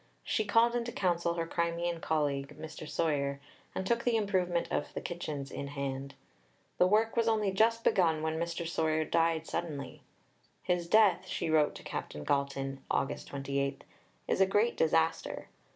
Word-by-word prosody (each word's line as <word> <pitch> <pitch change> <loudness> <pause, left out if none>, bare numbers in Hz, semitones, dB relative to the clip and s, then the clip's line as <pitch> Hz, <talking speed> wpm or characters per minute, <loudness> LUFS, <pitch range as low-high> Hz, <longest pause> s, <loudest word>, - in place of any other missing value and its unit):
She 215 - 0
called 230 +3 +4
into 240 0 -1
counsel 170 -4 0
her 165 -1 -1
Crimean 170 0 -1
colleague, 145 -2 -1
Mr. 155 0 -8
Soyer, 140 -4 0 0.4
and 190 - -2
took 235 +4 +1
the 240 -2 +2
improvement 185 -5 0
of - - -1
the - - -1
kitchens 150 -6 -5
in 140 - -5
hand. 140 -1 -4 0.6
The 180 - +6
work 220 +3 +2
was 230 -1 +2
only 215 -3 +2
just 230 +4 +3
begun 160 -4 +3
when 160 0 -1
Mr. 170 0 -2
Soyer 160 -1 +1
died 165 0 +1
suddenly. 145 -8 -4 0.6
"His 175 -1 0
death," 210 -2 +4
she 160 - -2
wrote 155 -2 +3
to - - -10
Captain 75 - -5
Galton 135 - -1
(Aug. 135 - +1
28), 140 0 -3 0.4
"is - - +1
a 190 - +6
great 210 +5 +2
disaster. 160 +1 +1
165 Hz, 160 wpm, -31 LUFS, 145-190 Hz, 0.6 s, The